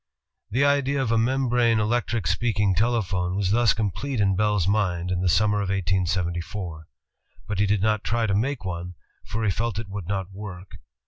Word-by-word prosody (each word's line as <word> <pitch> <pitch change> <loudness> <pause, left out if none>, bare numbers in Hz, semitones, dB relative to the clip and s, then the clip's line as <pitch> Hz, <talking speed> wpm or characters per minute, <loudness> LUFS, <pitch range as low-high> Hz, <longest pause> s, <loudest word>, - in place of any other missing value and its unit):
The 135 +6 +2
idea 140 -1 +2
of 130 -4 0
a 115 - +3
membrane 120 -2 +2
electric 115 -1 0
speaking 105 +2 +1
telephone 95 -4 0
was 100 -1 0
thus 115 0 +4
complete 115 +5 -2
in 100 -2 +3
Bell's 105 -3 +1
mind 90 -4 0
in 90 -1 0
the 90 - +2
summer 105 +4 +3
of 100 -2 -2
1874. 90 -2 -2 0.6
But 100 -1 -2
he 105 - +3
did 100 -1 +1
not 110 -1 +1
try 115 0 0
to 100 - 0
make 120 +2 -1
one, 90 0 -5 0.3
for 110 +2 -4
he 105 - +2
felt 115 +2 -2
it 110 -2 -5
would 95 -3 -6
not 95 -1 -3
work. 95 -2 -9
100 Hz, 185 wpm, -25 LUFS, 90-115 Hz, 0.6 s, thus